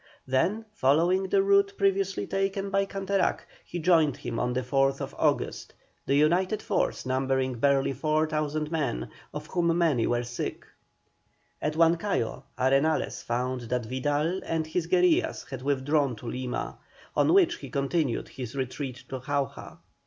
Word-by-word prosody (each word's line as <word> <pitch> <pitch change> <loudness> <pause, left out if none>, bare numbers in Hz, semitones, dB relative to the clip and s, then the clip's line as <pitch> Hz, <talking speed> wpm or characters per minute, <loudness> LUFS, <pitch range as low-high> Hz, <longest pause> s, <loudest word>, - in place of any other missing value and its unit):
Then 185 +13 +1
following 175 +5 +2
the 195 0 +3
route 200 0 +4
previously 195 -1 +1
taken 195 0 -1
by 195 0 +2
Canterac, 195 -1 0 0.2
he 175 - -6
joined 160 -4 +3
him 115 - -4
on 125 0 0
the 130 +1 -1
4th 135 0 0
August, - - -1 0.3
the 140 - +3
united 175 +8 +3
force - - -1
numbering 130 -1 0
barely 140 0 +3
4,000 155 +1 0
men, 140 - -1 0.2
of 150 0 -6
whom 170 0 +1
many 155 -9 +2
were 120 0 +1
sick. 120 0 -5 1.0
At 150 0 -1
Huancayo 165 - +1 0.2
Arenales 135 +5 +1
found 125 +2 -2
that 125 -2 -1
Vidal 145 +8 -1
and 160 -1 -1
his 165 +1 -2
guerillas 180 -1 +2
had 130 -2 -5
withdrawn 140 0 +1
to 110 - -12
Lima, 125 +1 -4 0.4
on - - +3
which 345 -3 +4
he - - -9
continued 140 -2 -1
his 125 -1 -7
retreat 130 -1 -4
to 130 - -4
Jauja. 140 +2 -3
150 Hz, 145 wpm, -27 LUFS, 130-180 Hz, 1.0 s, route